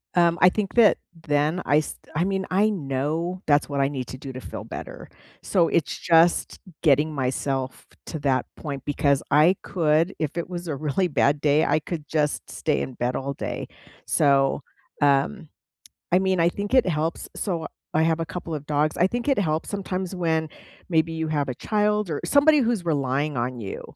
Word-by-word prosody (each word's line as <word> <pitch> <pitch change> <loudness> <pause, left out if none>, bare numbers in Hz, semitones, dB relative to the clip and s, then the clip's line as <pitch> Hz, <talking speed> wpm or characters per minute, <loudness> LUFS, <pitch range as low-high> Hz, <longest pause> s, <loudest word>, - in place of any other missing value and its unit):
Um, 170 -1 +3
I 180 - +8
think 200 0 -3
that 235 -3 +6 0.3
then 150 +5 +1
I 145 - +4
s 155 - -1 0.2
I 165 - +2
mean, 190 0 -1
I 200 +4 +3
know 160 +1 -2
that's 145 -1 +2
what 140 -1 -2
I 135 - +3
need 130 -4 -5
to 130 - -7
do 135 -1 -8
to 130 - -7
feel - - -7
better. - - -8 0.4
So, 175 -4 +2
it's 165 - 0
just 170 0 +3 0.2
getting 150 0 +3
myself 130 -1 -2 0.2
to 160 - -4
that 135 -3 +1
point, 140 -4 -6
because 140 -1 +1
I 165 +6 +5
could 165 +1 +1
if 155 -2 -3
it 170 - -3
was 175 -1 -6
a 155 - -2
really 155 +6 0
bad 145 -2 +1
day, 150 +1 +3
I - - +2
could 155 -1 -6
just 150 -2 -1
stay - - -1
in 130 - -4
bed 125 +1 -1
all 140 +1 -3
day. - - -5 0.4
So, 140 -1 +3 0.4
um, 145 +5 +2 0.6
I 180 - +6
mean, 190 -2 +1
I 165 - +5
think 200 +3 -4
it 255 -6 +5
helps. 160 -1 -2
So, 170 -5 -2 0.3
I 155 - +3
have 160 0 +1
a 165 - -2
couple 170 -1 -5
of 150 -1 -5
dogs. 150 +1 0
I 180 - +4
think 240 +6 -3
it 275 - +3
helps 160 -4 0
sometimes 190 -2 -3
when 160 -2 0 0.4
maybe 165 -2 +1
you 160 0 -2
have 145 -3 -1
a - - -3
child 210 - 0
er 150 - -3
somebody 295 +1 +5
who's 230 -8 0
relying 140 -1 0
on 120 +1 -2
you, 100 -3 -6
160 Hz, 195 wpm, -24 LUFS, 145-180 Hz, 0.6 s, I